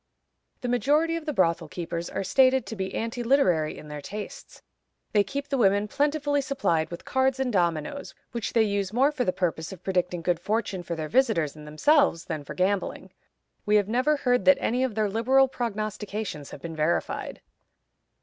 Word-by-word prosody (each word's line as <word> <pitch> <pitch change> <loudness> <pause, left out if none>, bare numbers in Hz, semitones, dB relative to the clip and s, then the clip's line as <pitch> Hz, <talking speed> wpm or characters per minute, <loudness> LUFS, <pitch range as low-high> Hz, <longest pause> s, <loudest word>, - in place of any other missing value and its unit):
The 250 - -3
majority 295 +7 +2
of 330 -1 -6
the - - +1
brothel 170 - +1
keepers 170 +1 -5
are 195 - -3
stated 260 +3 +4
to 225 - -6
be 190 -2 -4
anti 230 +2 -3
literary 185 - +2
in 150 - -10
their 150 -1 -7
tastes. 205 +7 -8 0.5
They 205 -1 +4
keep 280 +8 -5
the 275 -2 0
women 205 -1 +3
plentifully 290 +2 +1
supplied 260 - 0
with 170 - -8
cards 265 0 +1
and 255 -3 -1
dominoes, 175 - -1 0.2
which 235 -3 -4
they 230 - +5
use 200 -2 -1
more 265 +6 +3
for 285 -4 -1
the 185 - +1
purpose 165 -4 -2
of 190 - -11
predicting 180 -2 -1
good 175 -1 +1
fortunes 195 -2 -2
to 170 - -2
their 155 -1 -4
visitors 220 - +2
and 150 0 -11
themselves 275 - +3
than 150 - -4
for - - -8
gambling. 190 +1 -1 0.5
We 210 - +2
have 205 -2 +3
never 255 +7 +2
heard 245 -3 +1
that 280 0 +7
any 250 +3 0
of 255 -5 -1
their 215 -1 +1
liberal 255 +6 +3
prognostications 215 - -4
have 140 - -11
been 165 -1 -6
verified. 155 +2 -1
210 Hz, 190 wpm, -26 LUFS, 175-260 Hz, 0.5 s, that